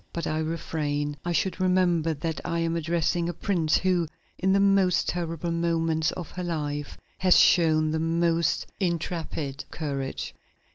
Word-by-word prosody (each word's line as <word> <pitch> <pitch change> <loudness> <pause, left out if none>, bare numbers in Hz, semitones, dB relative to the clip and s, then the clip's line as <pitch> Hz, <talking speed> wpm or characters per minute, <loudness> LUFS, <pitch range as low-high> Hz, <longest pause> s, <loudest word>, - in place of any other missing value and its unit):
But 170 -2 -3
I 155 - -1
refrain; 150 -2 -2
I 175 - -2
should 185 +4 0
remember 175 -3 +2
that 160 +2 -3
I 170 -1 -2
am 165 0 0
addressing 170 +1 0
a 175 - -4
princess 170 -5 +1
who, 180 -3 +2 0.3
in 190 +1 +1
the 195 - +4
most 195 -2 +3
terrible 170 -1 -2
moments 165 -2 +1
of 175 - -7
her 180 - -5
life, 150 -4 -3 0.2
has 185 -1 +5
shown 155 -3 +4
the 160 - 0
most 165 0 +1
intrepid 165 -5 -2
courage." 140 -4 -4
165 Hz, 150 wpm, -26 LUFS, 155-175 Hz, 0.3 s, has